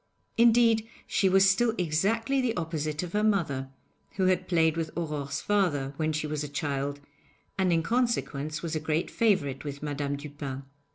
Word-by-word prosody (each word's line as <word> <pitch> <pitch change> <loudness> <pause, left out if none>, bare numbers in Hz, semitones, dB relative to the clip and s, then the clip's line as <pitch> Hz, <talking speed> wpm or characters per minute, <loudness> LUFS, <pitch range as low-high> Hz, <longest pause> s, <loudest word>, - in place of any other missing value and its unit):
Indeed, 230 -1 +4 0.2
she 190 - +2
was 195 +1 +5
still 225 +4 +3
exactly 220 - +1
the 235 -5 -1
opposite 155 -2 -2
of 175 - -7
her 210 0 +1
mother, 160 -11 0 0.4
who 190 - 0
had 185 0 +2
played 160 -3 +3
with 165 -1 -2
Aurore's 145 -4 -3
father 155 -10 +1
when 155 -1 0
she 155 0 -2
was 150 0 -3
a 150 - -5
child, 140 0 -2 0.6
and 190 -2 +1
in 165 -1 +2
consequence 160 - -1
was 165 -2 -3
a - - 0
great 155 +1 -1
favourite 160 - +1
with 145 0 -6
Madame 145 -1 -2
Dupin. 140 -2 -6
160 Hz, 170 wpm, -28 LUFS, 145-195 Hz, 0.6 s, was